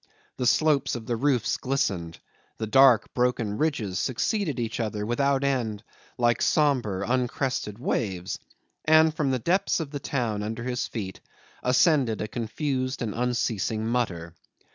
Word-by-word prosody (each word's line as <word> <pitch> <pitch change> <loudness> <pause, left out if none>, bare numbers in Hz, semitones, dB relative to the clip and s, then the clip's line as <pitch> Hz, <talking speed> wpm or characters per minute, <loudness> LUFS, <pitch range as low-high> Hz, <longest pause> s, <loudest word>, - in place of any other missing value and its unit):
The 125 - 0
slopes 145 -1 +3
of 115 -2 -6
the 120 - -1
roofs 125 -1 +1
glistened, 95 -12 -1 0.4
the 110 - -2
dark 125 +1 +5
broken 120 -4 0
ridges 110 - 0
succeeded 150 - -1
each 115 0 -3
other 105 -2 -2
without 140 +4 +1
end 120 -6 -1 0.3
like 120 -1 +2
sombre, 120 -10 +2
uncrested 125 -3 -1
waves, 95 -7 -2 0.4
and 155 0 +5
from 150 -3 0
the 130 - +1
depths 180 - +1
of 155 -4 -4
the 145 - -4
town 120 -7 -2
under 110 +2 -4
his 125 0 -2
feet 95 -5 -6 0.4
ascended 125 - +3
a 105 - -2
confused 130 +3 -2
and 110 -3 -3
unceasing 115 -3 -1
mutter. 95 -9 -2
125 Hz, 140 wpm, -26 LUFS, 110-140 Hz, 0.4 s, dark